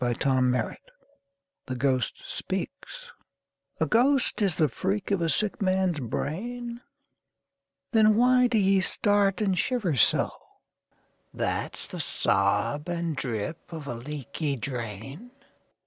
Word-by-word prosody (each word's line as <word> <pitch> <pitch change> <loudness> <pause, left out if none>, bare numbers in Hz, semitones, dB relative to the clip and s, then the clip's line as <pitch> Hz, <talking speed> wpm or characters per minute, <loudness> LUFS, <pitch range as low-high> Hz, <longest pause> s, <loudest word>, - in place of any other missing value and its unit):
Don 130 +1 +2
Marquis 125 - +2
Haunted - - -6 0.9
(The 130 - -3
Ghost 130 -1 0
Speaks) 485 - -5 0.7
A - - +3
GHOST 250 0 +2
is 195 -5 +2
the 155 -3 +3
freak 195 - -2
of 195 -3 +1
a 165 - +1
sick 210 +8 -1
man's 185 -4 +1
brain? 235 - -4 1.1
Then 215 -2 +5
why 250 +2 +5
do 235 -2 +1
ye 195 -1 +4
start 205 +1 +2
and 195 -3 +2
shiver 200 - 0
so? 120 - +4 1.0
That's - - -3
the - - -7
sob 105 - +1
and 170 -2 -2
drip 125 +5 -4
of 160 -3 -6
a 130 - -4
leaky 140 +3 -4
drain? 125 - -6
170 Hz, 125 wpm, -27 LUFS, 135-210 Hz, 1.1 s, Then